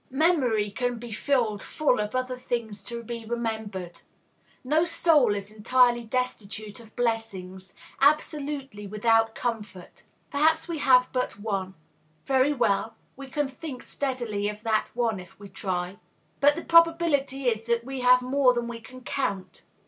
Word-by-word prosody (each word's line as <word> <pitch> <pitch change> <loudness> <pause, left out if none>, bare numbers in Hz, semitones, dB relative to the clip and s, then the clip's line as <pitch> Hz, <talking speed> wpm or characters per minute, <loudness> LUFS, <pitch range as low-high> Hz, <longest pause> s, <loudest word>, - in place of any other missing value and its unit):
Memory 260 - +2
can 245 +2 -2
be 235 0 -8
filled 220 -3 0
full 290 -7 +1
of 210 +3 -2
other 255 0 -1
things 230 -5 -4
to 235 -1 -5
be 235 0 -6
remembered. 220 -6 -4 0.6
No 305 +5 +2
soul 305 -9 +3
is 200 +1 -6
entirely 240 +3 +3
destitute 220 -2 -4
of 225 -2 -16
blessings, 190 -6 -3 0.2
absolutely 280 -6 0
without 225 +2 +2
comfort. 210 -6 -5 0.3
Perhaps 320 +3 +2
we 335 -3 -3
have 255 -2 +5
but 250 -5 -2
one. 195 -3 -3 0.5
Very 265 +1 +3
well; 225 -5 0 0.2
we 275 0 -9
can 290 +1 -1
think 265 -1 -8
steadily 240 -7 -2
of 210 +1 -8
that 220 -1 +1
one, 230 -4 0
if 180 +1 -14
we 200 -1 -11
try. 185 0 -3 0.4
But 290 +1 +5
the 335 - -6
probability 325 -6 +3
is 225 -2 0
that 235 0 +1
we 265 -1 -5
have 250 0 +5
more 255 -1 +3
than 240 0 -1
we 235 -1 -7
can 255 +2 -12
count. 240 -8 -3
240 Hz, 150 wpm, -26 LUFS, 210-270 Hz, 0.6 s, have